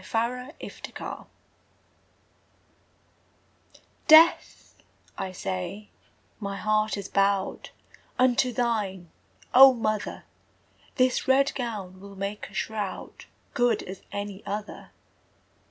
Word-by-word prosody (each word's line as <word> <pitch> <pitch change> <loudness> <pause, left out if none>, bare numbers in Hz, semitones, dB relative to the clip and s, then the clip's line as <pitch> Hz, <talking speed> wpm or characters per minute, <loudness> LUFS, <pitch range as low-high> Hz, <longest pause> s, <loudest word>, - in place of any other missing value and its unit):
The 240 +4 -2 0.4
Shroud - - -7 2.8
Death, 320 +1 +5 0.4
I 190 - -4
say, 180 - -5 0.5
my 200 -2 -4
heart 215 0 +1
is 200 -1 -5
bowed 195 -1 0 0.5
Unto 250 0 +3
thine, 210 -8 -2 0.4
O 265 0 +9
mother! 215 -2 -2 0.7
This 255 -1 +1
red 275 +1 +4
gown 210 -7 -5
will 200 0 -11
make 200 +2 -5
a - - -18
shroud 210 -3 -4 0.3
Good 245 -1 +2
as 190 0 -9
any 200 -1 -5
other! 205 +1 -6
210 Hz, 90 wpm, -26 LUFS, 195-245 Hz, 2.8 s, O